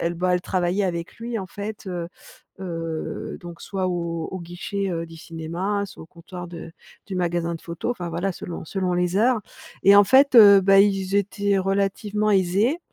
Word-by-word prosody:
bah, 180 Hz, +1 st, +1 dB
elle 180 Hz, -, +1 dB
travaillait 185 Hz, +2 st, 0 dB
avec 170 Hz, -2 st, -3 dB
lui, 230 Hz, 0 st, -4 dB
en 190 Hz, -, -6 dB
fait. 205 Hz, +2 st, -7 dB
Heu 175 Hz, -2 st, -4 dB, 0.5 s
heu, 165 Hz, -3 st, -5 dB
donc 170 Hz, -1 st, -10 dB
soit 190 Hz, -2 st, -2 dB
au 170 Hz, -2 st, -2 dB
au 190 Hz, -, -5 dB
guichet, 185 Hz, +3 st, -4 dB
heu, 165 Hz, -1 st, -3 dB
du 165 Hz, 0 st, -13 dB
cinéma, 170 Hz, +6 st, -3 dB
soit 195 Hz, -, -12 dB
au -, -, -12 dB
comptoir 175 Hz, +1 st, -10 dB
de 170 Hz, -1 st, -9 dB, 0.3 s
du 200 Hz, -, -7 dB
magasin 175 Hz, -1 st, -1 dB
de 165 Hz, -, -8 dB
photos, 170 Hz, +7 st, -4 dB
enfin 180 Hz, -8 st, -5 dB
voilà, 175 Hz, +4 st, -2 dB
selon 175 Hz, -2 st, -7 dB
selon 185 Hz, +1 st, -2 dB
les 180 Hz, 0 st, 0 dB
heures. 230 Hz, +2 st, +3 dB, 0.4 s
Et 200 Hz, +2 st, +7 dB
en 205 Hz, -, +8 dB
fait, 265 Hz, +6 st, +5 dB
heu 200 Hz, -3 st, +10 dB
bah, 195 Hz, +1 st, +5 dB
ils 195 Hz, -1 st, +2 dB
étaient 200 Hz, 0 st, +1 dB
relativement 200 Hz, +2 st, 0 dB
aisés 200 Hz, -, +2 dB
185 Hz, 185 wpm, -23 LUFS, 170-200 Hz, 0.5 s, heu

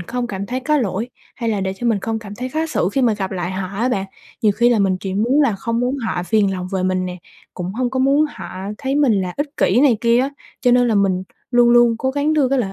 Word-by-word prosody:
không 240 Hz, +7 st, -3 dB
cảm 200 Hz, -2 st, -5 dB
thấy 255 Hz, +2 st, -3 dB
có 300 Hz, +4 st, +1 dB
lỗi, 220 Hz, 0 st, -2 dB, 0.3 s
hay 230 Hz, -2 st, -2 dB
là 205 Hz, -3 st, -1 dB
để 190 Hz, 0 st, -1 dB
cho 240 Hz, -, -3 dB
mình 220 Hz, -3 st, +2 dB
không 225 Hz, +1 st, -2 dB
cảm 205 Hz, -2 st, -9 dB
thấy 255 Hz, +4 st, -5 dB
khó 315 Hz, +4 st, -1 dB
xử 250 Hz, -, 0 dB
khi 270 Hz, -, +1 dB
mà 225 Hz, -3 st, +3 dB
gặp 190 Hz, -2 st, -3 dB
lại 180 Hz, -1 st, -3 dB
họ 185 Hz, 0 st, -4 dB
á 245 Hz, +2 st, +1 dB
bạn. 195 Hz, -6 st, -1 dB, 0.4 s
Nhiều 210 Hz, -2 st, +4 dB
khi 235 Hz, +4 st, +3 dB
là 235 Hz, -3 st, +3 dB
mình 190 Hz, -2 st, +2 dB
chỉ 190 Hz, -1 st, -4 dB
muốn 245 Hz, +8 st, +2 dB
là 260 Hz, -7 st, +2 dB
không 230 Hz, +4 st, -2 dB
muốn 250 Hz, +3 st, 0 dB
họ 225 Hz, -8 st, -2 dB
phiền 200 Hz, 0 st, +2 dB
lòng 185 Hz, -1 st, -4 dB
về 190 Hz, -1 st, 0 dB
mình 185 Hz, 0 st, 0 dB
nè, 180 Hz, -, -5 dB, 0.4 s
cũng 180 Hz, 0 st, -4 dB
hông 245 Hz, +3 st, -1 dB
có 260 Hz, -, -2 dB
muốn 275 Hz, +3 st, +3 dB
họ -, -, -9 dB, 0.3 s
thấy 270 Hz, 0 st, -2 dB
mình 285 Hz, -6 st, +3 dB
là 180 Hz, -1 st, -3 dB
ích 290 Hz, 0 st, -4 dB
kỷ 220 Hz, +8 st, +3 dB
này 265 Hz, -6 st, +4 dB
kia 235 Hz, 0 st, +3 dB
á, 270 Hz, +2 st, -1 dB, 0.3 s
cho 250 Hz, -, +3 dB
nên 245 Hz, 0 st, +4 dB
là 220 Hz, -, +2 dB
mình 190 Hz, -2 st, +2 dB, 0.3 s
luôn 240 Hz, -1 st, +5 dB
luôn 240 Hz, -1 st, +5 dB
cố 260 Hz, -, 0 dB
gắng 290 Hz, +3 st, 0 dB
đưa 290 Hz, -4 st, +2 dB
cái 275 Hz, 0 st, +1 dB
lợi 195 Hz, -5 st, -1 dB
230 Hz, 290 wpm, -19 LUFS, 195-255 Hz, 0.4 s, luôn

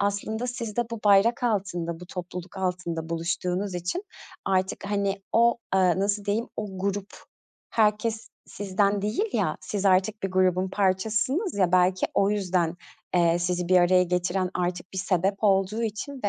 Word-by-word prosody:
aslında 210 Hz, +4 st, -1 dB
siz 235 Hz, -4 st, -5 dB
de 240 Hz, -1 st, -1 dB
bu 230 Hz, -, -5 dB
bayrak 210 Hz, +5 st, +4 dB
altında, 180 Hz, -7 st, -1 dB
bu 180 Hz, -, -9 dB
topluluk 180 Hz, 0 st, -7 dB
altında 180 Hz, -3 st, -3 dB
buluştuğunuz 180 Hz, +3 st, -2 dB
için 180 Hz, -, -3 dB, 0.4 s
artık, 190 Hz, +1 st, 0 dB
hani, 200 Hz, -1 st, -1 dB
o, 235 Hz, +1 st, +4 dB, 0.2 s
ııı, 185 Hz, -1 st, +3 dB
nasıl 200 Hz, +1 st, 0 dB
diyeyim, 215 Hz, +3 st, -1 dB
o 195 Hz, -3 st, -5 dB
grup 200 Hz, +1 st, -2 dB, 0.6 s
herkes 220 Hz, +1 st, +1 dB, 0.2 s
sizden 200 Hz, 0 st, 0 dB
değil 215 Hz, -, 0 dB
ya, -, -, 0 dB
siz 205 Hz, -1 st, -4 dB
artık 195 Hz, +3 st, +2 dB
bir 195 Hz, -, -1 dB
grubun 185 Hz, 0 st, +2 dB
parçasısınız, 220 Hz, -, 0 dB
ya, 180 Hz, -2 st, +2 dB
belki 185 Hz, 0 st, +3 dB
o 200 Hz, +1 st, +3 dB
yüzden, 180 Hz, -4 st, 0 dB, 0.4 s
eee, 170 Hz, -1 st, +4 dB
sizi 175 Hz, 0 st, -1 dB
bir 185 Hz, -, +5 dB
araya 180 Hz, +1 st, +5 dB
getiren 180 Hz, +1 st, 0 dB
artık 180 Hz, 0 st, -3 dB
bir 190 Hz, -, -4 dB
sebep 190 Hz, 0 st, +1 dB
olduğu 195 Hz, +2 st, +2 dB
için 230 Hz, +5 st, -4 dB
ve, -, -, +3 dB
195 Hz, 160 wpm, -26 LUFS, 180-210 Hz, 0.6 s, bir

